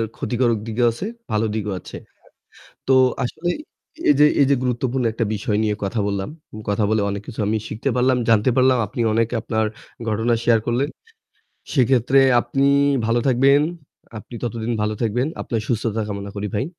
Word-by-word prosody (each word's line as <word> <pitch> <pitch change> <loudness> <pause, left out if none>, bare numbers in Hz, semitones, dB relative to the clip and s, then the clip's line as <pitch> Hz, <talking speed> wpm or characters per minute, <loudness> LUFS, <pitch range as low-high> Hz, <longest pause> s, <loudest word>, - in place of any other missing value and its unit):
ক্ষতিকারক 120 -3 0
দিকেও 120 +2 +1
আছে, 120 - -6 0.3
ভালো 110 +1 +1
দিকও 105 -2 -2
আছে। - - -11 0.9
তো 135 - +4 0.3
আসলে 165 +8 -3 0.6
এই - - +8
যে 150 - +8 0.2
এই - - +6
যে 140 - +5
গুরুত্বপূর্ণ 125 +1 -1
একটা 115 +1 -2
বিষয় 105 0 -1
নিয়ে 105 -1 0
কথা 100 +3 -2
বললাম। 100 -1 -2 0.4
কথা 105 +1 +1
বলে 110 -1 +2
অনেক 100 0 -4
কিছু 120 - -8
আমি 110 +1 +1
শিখতে 115 +6 -3
পারলাম, 125 +1 +3
জানতে 115 +2 +4
পারলাম 130 -1 +4
আপনি 120 - -4
অনেক 115 0 +2
আপনার 110 0 -1 0.4
ঘটনা 110 +3 +1
শেয়ার 115 -2 +4
করলেন। 125 +5 0 0.9
সেক্ষেত্রে 130 0 +3 0.2
আপনি 135 +4 0 0.4
ভালো 115 +1 +2
থাকবেন, 135 +2 +4 0.6
আপনি 120 - -12
ততদিন 120 -1 -3
ভালো 105 0 -1
থাকবেন। 120 +4 0 0.2
আপনার 115 - -2
সুস্থতা 115 -1 -1
কামনা 100 -1 -5
করি 105 +1 -3
ভাই। 105 - 0
115 Hz, 165 wpm, -21 LUFS, 110-125 Hz, 0.9 s, এই